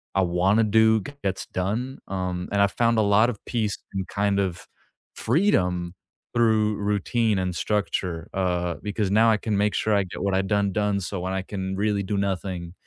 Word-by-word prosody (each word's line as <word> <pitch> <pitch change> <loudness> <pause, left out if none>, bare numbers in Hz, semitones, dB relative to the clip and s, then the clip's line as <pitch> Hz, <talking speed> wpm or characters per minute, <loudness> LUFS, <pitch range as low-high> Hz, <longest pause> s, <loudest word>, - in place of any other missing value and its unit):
I 95 - +4
wanna 95 +5 +2
do 110 +1 +4
gets 100 -4 -4
done. 110 +9 -3
Um, 90 -2 -3
and 100 0 +2
I've 100 0 +3
found 115 -1 +2
a - - +4
lot 105 +3 +4
of 110 -5 -6
peace 110 -5 -1 0.2
and 95 -1 -3
kind 100 0 0
of 90 -3 -3 0.5
freedom 90 - +1 0.4
through 110 -2 +3
routine 105 +2 0
and 90 -1 -1
structure, 90 -5 -2
uh, 90 -2 0
because 105 -1 -2
now 115 +2 +5
I 110 - +4
can 105 -1 -2
make 105 +1 +2
sure 110 - +1
I 100 -1 +3
get 90 - -8
what 100 -1 0
I 95 - +3
done 100 0 +1
done, 105 0 0
so 95 0 -4
when 95 +1 -3
I 95 - -1
can 95 -1 -4
really 100 0 0
do 100 +1 -2
nothing, 95 -3 -3
100 Hz, 190 wpm, -25 LUFS, 95-110 Hz, 0.5 s, now